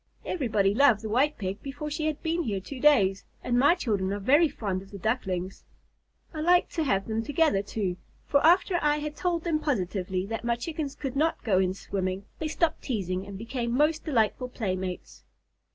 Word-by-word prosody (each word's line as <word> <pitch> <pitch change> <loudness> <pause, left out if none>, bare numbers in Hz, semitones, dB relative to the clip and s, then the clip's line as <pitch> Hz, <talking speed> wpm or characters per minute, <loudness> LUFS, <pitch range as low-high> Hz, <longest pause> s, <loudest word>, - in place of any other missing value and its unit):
Everybody 215 - +1
loved 235 -3 +4
the 220 - -4
White 270 +7 +2
Pig 195 0 -4
before 290 +2 -6
she 310 +1 -1
had 310 -1 -3
been 335 +1 0
here 210 - -2
two 255 +8 -8
days, 205 -10 +4 0.2
and 245 0 +1
my 285 +6 +5
children 205 - -1
are 200 - -1
very 290 - +4
fond 195 -7 -3
of 195 - -14
the 200 - -8
Ducklings. 195 -4 -2 0.7
I 310 - -4
like 350 +2 +4
to 325 - -1
have 195 -9 +1
them 220 0 -1
together, 290 -4 +2
too, 200 -3 -3 0.3
for 280 - +2
after 355 +2 +4
I 295 0 +2
had 300 0 -4
told 345 -2 -1
them 325 -3 0
positively 190 - -1
that 225 +3 -4
my 235 0 +1
Chickens 290 +2 -4
could 270 -2 -5
not 315 +4 +1
go 195 -6 +3
in 185 0 +1
swimming, 190 0 -3
they 315 - -2
stopped 320 +1 0
teasing 190 -6 -3
and 200 -1 -7
became 235 +2 -3
most 305 +2 +2
delightful 250 -3 0
playmates." 185 - -4
235 Hz, 195 wpm, -27 LUFS, 195-300 Hz, 0.7 s, my